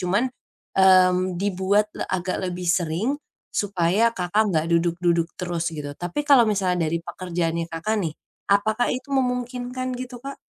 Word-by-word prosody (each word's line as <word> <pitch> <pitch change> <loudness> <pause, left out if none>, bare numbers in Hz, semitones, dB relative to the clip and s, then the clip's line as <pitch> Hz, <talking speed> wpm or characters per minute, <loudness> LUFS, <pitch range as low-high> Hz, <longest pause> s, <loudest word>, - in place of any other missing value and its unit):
cuman, 195 +7 +1 0.5
mmm, 185 -1 +4
dibuatlah 200 +2 0
agak 185 0 -2
lebih 180 -1 -4
seringm 175 - 0 0.3
supaya 200 +2 +2
Kakak 205 +4 +1
enggak 160 -4 +1
duduk-duduk 170 0 +2
terus 175 -1 -2
gitu. 150 -3 -6
Tapi 175 - -4
kalau 260 -6 +6
misalnya 180 -5 +1
dari 170 +2 -2
pekerjaannya 170 -2 -2
Kakak 165 +7 -2
nih, 160 -5 -3 0.3
apakah 215 +4 +2
itu 255 +2 -3
memungkinkan 250 0 -1
gitu, 250 0 -6
Kak? 275 +3 -8
185 Hz, 135 wpm, -24 LUFS, 170-220 Hz, 0.5 s, kalau